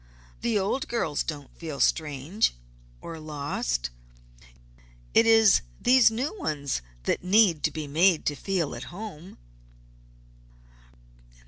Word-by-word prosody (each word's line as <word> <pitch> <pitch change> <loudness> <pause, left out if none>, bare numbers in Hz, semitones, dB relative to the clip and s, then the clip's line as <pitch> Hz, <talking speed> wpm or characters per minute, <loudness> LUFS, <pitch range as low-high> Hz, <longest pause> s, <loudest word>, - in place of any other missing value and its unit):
The 235 -3 +1
old 205 +7 -1
girls 165 -11 -1
don't 145 -4 -6
feel 155 -4 -6
strange, 155 - +1 0.5
or 165 -1 -8
lost; 140 - -3 1.2
it 225 - +5
is 225 -3 +6 0.2
these 255 -2 +6
new 255 - -3
ones 140 - -2 0.2
that - - -1
need 185 -4 +4
to - - +3
be 155 0 -5
made 165 +4 +3
to 145 - 0
feel 175 -1 -2
at 120 - -7
home." 180 - -9
165 Hz, 115 wpm, -26 LUFS, 145-215 Hz, 1.2 s, is